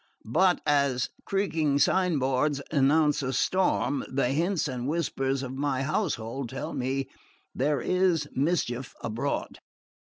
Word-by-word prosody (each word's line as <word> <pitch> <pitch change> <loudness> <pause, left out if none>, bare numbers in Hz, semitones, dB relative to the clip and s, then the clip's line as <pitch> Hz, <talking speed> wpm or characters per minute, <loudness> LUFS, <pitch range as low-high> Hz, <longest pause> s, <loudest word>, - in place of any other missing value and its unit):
But 180 +1 +4
as 140 -4 +2 0.2
creaking 165 -8 +1
signboards 145 -3 +2
announce 150 +1 +3
a 130 -1 -2
storm, 180 -3 +1
the 130 -2 +1
hints 165 +4 0
and 125 -2 -4
whispers 135 -4 -1
of 130 0 -5
my 135 -1 -1
household 135 - -2
tell 135 - -5
me 135 +1 -2 0.5
there 145 +2 +1
is 180 -5 +1
mischief 135 -4 -1
abroad. 120 +6 -3
140 Hz, 120 wpm, -27 LUFS, 130-160 Hz, 0.5 s, But